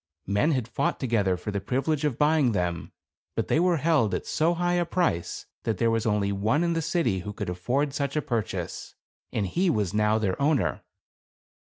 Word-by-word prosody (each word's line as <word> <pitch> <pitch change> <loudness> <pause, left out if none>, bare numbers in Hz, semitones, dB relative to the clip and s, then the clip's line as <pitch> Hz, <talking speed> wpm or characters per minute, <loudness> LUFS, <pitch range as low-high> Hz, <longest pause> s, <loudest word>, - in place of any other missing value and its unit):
Men 105 - +2
had 125 -5 -1
fought 125 +4 -1
together 105 -8 +1
for 95 +4 -5
the 100 -1 -2
privilege 135 +8 -1
of 135 -5 0
buying 150 -5 +3
them. 90 -3 -2 0.4
But - - -2
they - - +3
were 175 -1 +3
held 150 -8 +2
at - - -4
so 165 +3 +1
high 175 +1 0
a 175 0 +2
price 165 - -1 0.2
that 110 -3 -1
there 115 +3 +2
was 115 0 0
only 105 -2 +1
one 110 - +1
in 170 -1 +1
the 165 - 0
city 155 - 0
who 105 +3 -6
could 90 - -4
afford 130 +11 -1
such 140 -1 -2
a 150 - +2
purchase; 115 -4 -3 0.4
and 105 - -1
he 180 - +1
was 105 - 0
now 105 +1 +3
their 105 +1 -1
owner. 145 -3 +1
120 Hz, 200 wpm, -26 LUFS, 105-155 Hz, 0.4 s, buying